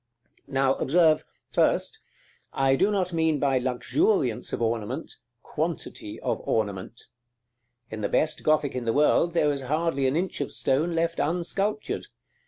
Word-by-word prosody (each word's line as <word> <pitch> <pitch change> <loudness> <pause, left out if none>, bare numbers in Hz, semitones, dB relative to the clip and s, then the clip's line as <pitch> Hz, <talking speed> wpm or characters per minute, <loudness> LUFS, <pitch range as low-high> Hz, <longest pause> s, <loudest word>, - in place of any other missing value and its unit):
Now, 135 -1 +2
observe, 155 +1 +4 0.3
first, - - +1 0.5
I 135 0 +2
do 195 +9 +3
not 185 -4 0
mean 160 -2 +2
by 135 -2 +2
luxuriance 125 - 0
of - - -2
ornament, 115 +5 -2 0.3
quantity 155 -9 -4
of - - -1
ornament. 105 +1 -2 0.9
In 110 0 -5
the 100 - -1
best 155 0 +1
Gothic 155 -2 +2
in 125 -2 -4
the 115 - +1
world 165 +3 +3
there 150 -3 +3
is 140 -1 -3
hardly 145 0 0
an 130 - 0
inch 180 -2 -1
of 140 - -3
stone 160 +6 +1
left 165 0 0
unsculptured. 195 +6 -1
145 Hz, 145 wpm, -26 LUFS, 130-165 Hz, 0.9 s, observe